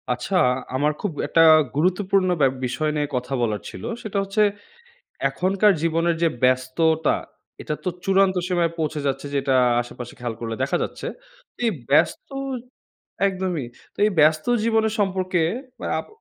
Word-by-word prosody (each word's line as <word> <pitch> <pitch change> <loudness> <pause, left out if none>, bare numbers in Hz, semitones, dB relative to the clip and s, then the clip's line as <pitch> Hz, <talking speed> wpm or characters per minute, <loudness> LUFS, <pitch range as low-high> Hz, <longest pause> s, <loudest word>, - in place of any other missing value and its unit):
আচ্ছা, 125 +10 -2 0.4
আমার 145 +3 +2
খুব 205 - -1 0.2
একটা 165 - +3 0.3
গুরুত্বপূর্ণ 185 +4 +2
ব্যা 135 - +6 0.2
বিষয় 125 +5 -1
নিয়ে 150 -1 0
কথা 125 +2 -3
বলার 105 -4 -1
ছিল। 90 - -10 0.2
সেটা 215 -3 -4
হচ্ছে 195 +2 0 0.9
এখনকার 195 +3 +2
জীবনের 165 +1 +1
যে - - +5 0.2
ব্যস্ততা 130 +5 +2 0.5
এটা - - -3
তো 185 - 0 0.2
চূড়ান্ত 195 0 +3
সীমায় 175 -2 +1
পৌঁছে 155 -1 -1
যাচ্ছে 135 +1 -2
যেটা 135 -1 +1 0.3
আশেপাশে 120 0 -9
খেয়াল 120 -2 -3
করলে 115 -1 -4
দেখা 135 - 0
যাচ্ছে। - - -6 0.5
তো - - -34
এই - - +2 0.2
ব্যস্ত 145 - +2 1.0
একদমই, 185 -7 -2 0.3
তো - - -36
এই - - +2
ব্যস্ত 155 +1 +4 0.2
জীবনের 220 -1 +2
সম্পর্কে 185 -3 0 0.6
আপ - - -6
165 Hz, 145 wpm, -23 LUFS, 135-190 Hz, 1.0 s, ব্যা